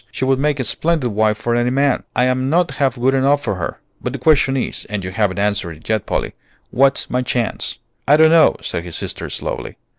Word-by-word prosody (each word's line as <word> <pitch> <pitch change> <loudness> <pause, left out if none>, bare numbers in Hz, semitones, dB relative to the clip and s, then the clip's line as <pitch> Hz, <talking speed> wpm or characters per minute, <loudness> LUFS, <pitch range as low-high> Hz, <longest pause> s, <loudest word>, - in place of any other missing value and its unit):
She 130 - -3
would 135 0 +2
make 150 0 0
a - - 0
splendid 155 -1 0
wife 105 +1 +1
for 120 +2 -2
any 120 +1 +1
man. 140 +1 +1
I'm 130 +1 +1
not 170 0 +2
half 135 -3 +2
good 130 +2 +2
enough 140 +2 +2
for - - -1
her; 90 - -4 0.2
but 125 - -3
the - - -3
question 135 0 +3
is, 130 - -3
and 105 -2 -4
you 90 - -5
haven't 100 -2 0
answered 100 -4 -1
it 80 - -16
yet, 110 -2 -1
Polly, - - -2 0.4
what's 135 +2 +2
my 125 - +1
chance?" 120 -2 -2 0.3
"I 145 +2 +6
don't 160 0 +6
know," 165 -1 +5
said 85 - -3
his 85 -2 -7
sister, - - -5
slowly. - - -5
130 Hz, 220 wpm, -19 LUFS, 110-140 Hz, 0.4 s, I